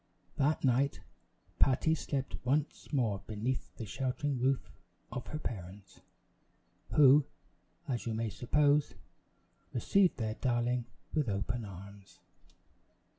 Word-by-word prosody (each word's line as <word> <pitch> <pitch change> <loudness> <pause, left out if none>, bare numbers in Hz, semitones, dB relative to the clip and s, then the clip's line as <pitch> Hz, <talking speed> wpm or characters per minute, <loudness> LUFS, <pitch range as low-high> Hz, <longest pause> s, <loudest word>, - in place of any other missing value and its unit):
That 145 +3 +2
night 135 +2 +2 0.6
Patty 135 +4 +4
slept 140 -3 -2
once 140 +4 -1
more 115 -9 +1
beneath 115 +5 -3
the 115 - -5
sheltering 135 +4 -2
roof 130 +1 +1 0.4
of 125 - -5
her 155 - -4
parents, 100 - -7 0.9
who, 145 0 +7 0.6
as 120 -3 -2
you 115 - -1
may 110 -1 -1
suppose, 145 +5 +2 0.8
received 185 +9 +3
their 110 -2 -1
darling 120 0 0 0.3
with 150 -7 +1
open 105 +4 -2
arms. 100 +1 -11
125 Hz, 110 wpm, -33 LUFS, 110-140 Hz, 0.9 s, who